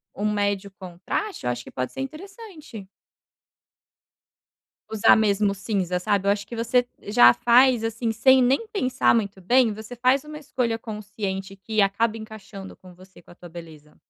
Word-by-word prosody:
um 210 +1 -1
médio 200 -1 -1
contraste, 185 - -5
eu - - +1
acho 120 0 -6
que - - -13
pode 130 0 -4
ser - - -10
interessante 310 - -10 2.0
usar 220 0 +4
mesmo 205 -1 +2
o - - -5
cinza, 190 -3 -2
sabe? 200 +1 -1
Eu 200 - +5
acho 205 0 -2
que 235 - -8
você 235 +2 +1 0.2
já 120 - +6
faz, 245 - +4
assim, 225 +1 -2
sem 260 +4 +4
nem 265 - +1
pensar 260 - +1
muito 200 -4 -2
bem 240 +4 +3
você 220 +3 -9
faz 255 +3 +2
uma 300 0 -9
escolha 250 -5 -2
consciente, 205 -3 -6
que 215 +2 -1
acaba 215 +3 +1
encaixando 215 -3 -10
com 185 -1 -16
você, 185 +1 -18
com 175 - -19
a - - -16
tua 175 -1 -13
beleza. 160 -3 -13
215 Hz, 170 wpm, -23 LUFS, 195-245 Hz, 2.0 s, já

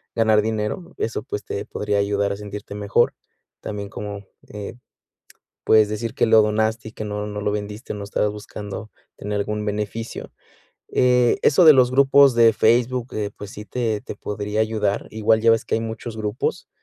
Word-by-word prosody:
ganar 110 -2 +4
dinero, 110 - -3
eso, 110 -2 -2
pues, 105 - -5
te 100 - -4
podría 105 -1 -1
ayudar 100 0 0
a - - -7
sentirte 105 0 -8
mejor. 105 -1 +2 0.5
También, 100 -1 -5
como, 100 -1 -7 0.2
eh, 105 -1 -7 0.9
puedes 110 -1 +5
decir 110 +2 -4
que - - +2
lo 110 -1 +6
donaste 110 +1 0
y - - -12
que 110 - -6
no 105 0 -4
no 105 0 -5
lo 105 - 0
vendiste, 105 +2 -5
o - - -6
no 100 - -6
estabas 105 +1 0
buscando 105 0 -8 0.3
tener 105 0 -3
algún 105 +1 -3
beneficio. 105 +2 -4 0.6
Eh, 125 -1 +3
eso 175 +5 +5
de 155 - +10
los 130 -3 +4
grupos 140 0 +6
de 115 -1 +6
Facebook, 120 +3 +1
eh, 105 -1 -2
pues, 100 -1 -8
sí 105 - -8
te 110 -2 -2
te - - -7
podría 105 +1 -3
ayudar. 110 -2 0
Igual 110 0 +2
ya 115 +1 +4
ves 115 - +1
que - - 0
hay - - -1
muchos 115 0 -6
grupos, 105 -1 -3
105 Hz, 185 wpm, -22 LUFS, 105-115 Hz, 0.9 s, de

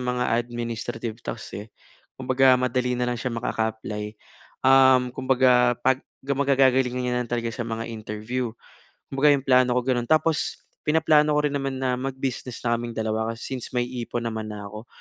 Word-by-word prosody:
mga 125 0 -1
administrative 120 -1 -4
task, 115 - -7
eh. 105 +2 -9 0.5
Kumbaga 130 0 +4
madali 125 0 0
na 125 0 0
lang 120 - -3
siya 125 - -2
makaka-apply, 110 -2 -3 0.6
um, 130 -1 +6
kumbaga 125 -2 +3
pag 130 0 +3 0.3
guma 140 0 0
gagagalingan 130 -2 +3
niya 125 - -1
na - - 0
lang - - -23
talaga 120 -1 -1
sa 120 - -4
mga 115 0 -4
interview. 110 +3 -4 0.6
Kumbaga 140 +2 +4
'yong 135 - -4
plano 125 -1 +4
ko - - +3
gano'n. 120 -2 0
Tapos 155 0 +1 0.2
pinaplano 150 -1 +3
ko 150 - +2
rin 145 - -1
naman 135 -1 -2
na 130 -1 0
mag-business 130 -2 -4
na 115 - +2
kaming 120 -1 -6
dalawa 110 0 -1
kasi 120 - -7
since 125 - -7
may 120 0 +1
ipon 120 -1 -4
naman 110 -1 -3
na 105 -1 -7
ako. 105 +3 -10
125 Hz, 175 wpm, -24 LUFS, 115-130 Hz, 0.6 s, um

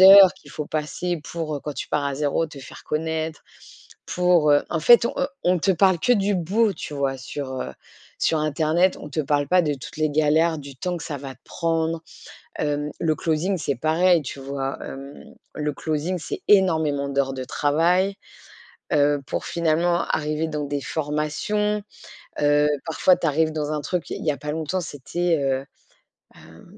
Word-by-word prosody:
heures 190 -1 +10
qu'il - - -17
faut 150 - -5
passer 160 +3 -2
pour, 160 -1 -4
heu, - - -7
quand 150 - -5
tu - - -5
pars 145 -1 0
à 140 -1 -1
0, 150 +3 0
te 150 -2 -11
faire 135 - -11
connaître. 160 0 -2 0.6
Pour, 180 -4 +3
heu, 145 0 +5
en 165 - 0
fait 235 +8 +7
on, - - -5
heu, 270 - +1 0.2
on 180 0 +3
te 195 - +2
parle 185 0 +4
que 245 - +3
du 205 -2 +2
beau 200 +5 +2
tu 155 - -7
vois 140 -2 -1
sur, 130 0 -5
heu, - - -4 0.5
sur 160 - +2
internet, 155 +4 +2
on - - -8
te 150 +2 -2
parle 145 0 +1
pas 180 +1 +4
de 150 -2 0
toutes 130 +2 -10
les 155 0 +1
galères, 155 +2 +2
du 140 -2 -10
temps 180 +6 -2
que 170 - -7
ça 150 - -4
va 135 -1 -8
prendre. 165 -1 -1 0.6
Hem, 145 0 -1
le 160 -2 +1
closing 170 +5 0
c'est 145 -4 -1
pareil, 165 +6 +3
tu 140 0 -7
vois. 135 0 -4
Hem, 140 +1 -9 0.3
le 150 -1 -2
closing 155 +5 -2
c'est 170 - -5
énormément 160 -8 +3
d'heures 135 -1 0
de 130 -1 -4
travail, 170 +9 +2 0.8
heu, 145 0 +3
pour - - -3
finalement 170 +1 +1
arriver 155 +1 0
dans 150 -1 -3
des 145 0 -2
formations. 155 +9 -1 0.6
Heu, 145 0 +4 0.2
parfois, 170 +3 +3
tu - - -2
arrives 155 +1 +2
dans 155 -1 -2
un 150 - -1
truc, 175 +4 -3
il - - -5
y 155 - +2
a 145 - -2
pas 150 0 -4
longtemps, 160 +4 -2
c'était, 165 +2 -1
heu, 135 0 0 0.7
ben, - - -16
155 Hz, 185 wpm, -23 LUFS, 145-175 Hz, 0.8 s, heures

